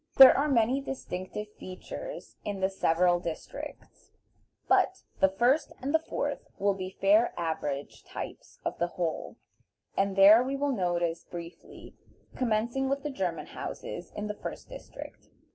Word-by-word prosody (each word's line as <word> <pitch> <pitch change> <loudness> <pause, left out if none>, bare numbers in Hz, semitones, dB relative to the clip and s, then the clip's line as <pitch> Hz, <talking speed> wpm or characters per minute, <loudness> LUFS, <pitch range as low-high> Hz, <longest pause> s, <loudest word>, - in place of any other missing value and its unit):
There 265 -1 +11
are 285 +2 +2
many 250 +1 +3
distinctive 210 -5 -5
features - - -8
in 205 -1 -3
the 190 +1 +1
several 175 -1 +3
districts, 170 -2 -8 0.6
but - - +3 0.2
the 190 - +5
first 250 +9 +2
and 275 +3 -3
the 320 - +5
fourth 320 - -3
will 200 0 +2
be 185 -1 -5
fair 210 +4 +4
average 155 -4 -3
types - - -8
of - - -3
the 175 - +2
whole, 170 -3 -2 0.6
and 195 0 +1
these 205 +5 +8
we 270 +2 -2
will 285 +1 0
notice 175 -3 0
briefly, 170 0 -10 0.4
commencing 240 +3 0
with 275 +1 -1
the 295 - -2
German 185 -9 -2
houses - - -7
in 210 - -3
the 210 - -2
first - - -7
district. - - -10
200 Hz, 145 wpm, -29 LUFS, 180-260 Hz, 0.6 s, There